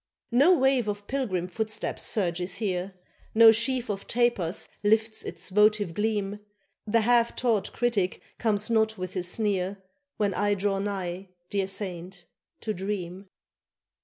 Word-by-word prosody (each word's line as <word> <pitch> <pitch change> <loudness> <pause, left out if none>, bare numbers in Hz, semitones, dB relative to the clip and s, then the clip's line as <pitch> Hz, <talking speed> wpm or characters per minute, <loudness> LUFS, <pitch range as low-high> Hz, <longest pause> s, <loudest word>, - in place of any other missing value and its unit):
No 290 +10 +6
wave 265 -4 +2
of 205 0 -3
pilgrim 210 -10 -2
footsteps 215 +3 -4
surges 180 -2 -1
here, 190 -3 -2 0.4
No 225 0 +9
sheaf 240 +3 0
of 200 -2 -4
tapers 230 -7 0 0.2
lifts 220 +1 +2
its - - -6
votive 210 -2 +3
gleam, 210 0 -1 0.5
The 230 +2 +3
half 235 +1 +3
taught 230 -5 0
critic 225 -6 0 0.2
comes 215 -1 0
not 220 -1 +2
with 185 -1 -5
his 180 -2 -2
sneer, 200 -2 -1 0.4
When 205 -2 +1
I 205 +2 +1
draw 195 0 0
nigh, 190 -2 -4 0.2
dear 195 -2 0
saint, 185 -2 -6 0.4
to 215 - -2
dream. 190 -1 -5
205 Hz, 135 wpm, -27 LUFS, 190-225 Hz, 0.5 s, No